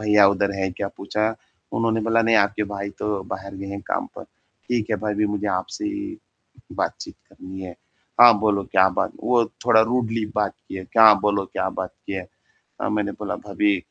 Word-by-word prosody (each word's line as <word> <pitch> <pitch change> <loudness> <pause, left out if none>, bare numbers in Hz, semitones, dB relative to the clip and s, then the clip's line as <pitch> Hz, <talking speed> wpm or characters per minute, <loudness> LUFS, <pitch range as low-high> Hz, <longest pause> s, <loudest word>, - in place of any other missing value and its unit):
भैया 105 -1 +5
उधर 100 0 +1
हैं 95 -1 -1
क्या 100 +2 -4
पूछा?" 110 +3 -1 0.4
उन्होंने 115 0 +1
बोला 115 +1 +2
"नहीं, 115 0 +3
आपके 105 0 +2
भाई 100 0 -4
तो 105 -2 -1
बाहर 95 +1 -6
गए 100 +1 -7
हैं 100 0 -5
काम - - -1
पर। - - -8 0.4
ठीक 115 -3 -1
है, 110 - +2
भाभी 105 +1 0
मुझे 105 0 -2
आपसे 95 - -3
ही 310 +1 -4 0.6
बातचीत - - -4
करनी 95 +1 -10
है। 90 -2 -7 0.5
हाँ, 120 -3 +9
बोलो 105 -2 +1
क्या 95 0 +4
बात," 90 - -1
वो 120 -2 +3 0.2
थोड़ा 110 -2 +6
रूडली 115 -1 0
बात 105 -2 0
किए, 95 -1 -6
"क्या 110 0 +7
बोलो 100 -1 +2
क्या - - -1
बात - - -5
की - - -4
है" 95 -2 -4 0.5
अ, - - -1
मैंने 105 -1 -1
बोला 105 - -5
"भाभी 100 0 +2
105 Hz, 190 wpm, -23 LUFS, 100-110 Hz, 0.6 s, हाँ